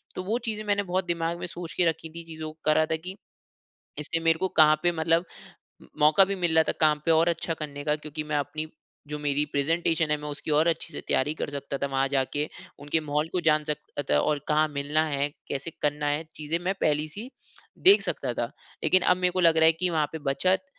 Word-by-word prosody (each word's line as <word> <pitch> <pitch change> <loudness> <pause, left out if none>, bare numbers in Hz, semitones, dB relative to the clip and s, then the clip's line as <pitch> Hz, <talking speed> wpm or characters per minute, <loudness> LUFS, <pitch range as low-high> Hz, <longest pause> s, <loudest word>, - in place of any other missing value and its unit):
तो 185 - -3
वो 215 +5 0
चीज़ें 215 -2 -3
मैंने 205 -1 +1
बहुत 185 -1 -1
दिमाग 170 0 -1
में - - -4
सोच 170 -1 -6
के 180 - +2
रखी 160 0 -1
थी 170 - -6
चीज़ों 160 -1 -6
को 155 - -21
करा 155 +1 +4
था 160 - -1
कि 180 +4 -7 0.8
इससे 155 +2 -1
मेरे 165 0 +3
को 190 - +1
कहाँ 155 -1 +7
पे 175 - +4
मतलब 165 +1 +1 0.7
मौका 155 +6 +6
भी 200 +1 -2
मिल 175 -3 0
रहा 160 - +6
था - - +3
काम 150 -1 +3
पे 165 - +4
और 160 +2 +4
अच्छा 165 0 -1
करने 145 -2 -6
का 150 0 +1
क्योंकि 155 0 -6
मैं 150 - +2
अपनी 155 +2 -3 0.4
जो 150 0 -5
मेरी 145 0 0
प्रेजेंटेशन 160 +2 +1
है 150 - +2
मैं 150 0 -6
उसकी 145 +1 -4
और 155 +3 +4
अच्छी 170 -1 -1
से - - -5
तैयारी 145 +3 +1
कर - - -2
सकता 140 -1 -4
था 140 - -1
वहाँ 135 0 +1
जाके, 140 +2 -1 0.3
उनके 145 +3 0
माहौल 150 0 -1
को 180 - 0
जान 155 -2 +3
सकता 150 -1 -5
था 75 - +5
और 150 - +1
कहाँ 155 +1 +3
मिलना 145 +2 0
है? 140 -1 0 0.2
कैसे 140 +4 -4
करना 150 0 0
है? 145 +2 0
चीज़े 155 +2 -2
मैं 180 +2 -1
पहली-सी 155 - -1 0.5
देख 390 +3 +6
सकता - - -2
था। - - -1 0.4
लेकिन 185 - +4
अब 180 - +3
मेरे 180 -1 +1
को 185 - -2
लग 165 -2 +4
रहा 160 - +5
है 160 - +7
की 180 +3 0
वहाँ 155 -3 +1
पे 160 - -5
बचत 185 - +1
155 Hz, 235 wpm, -27 LUFS, 150-170 Hz, 0.8 s, कहाँ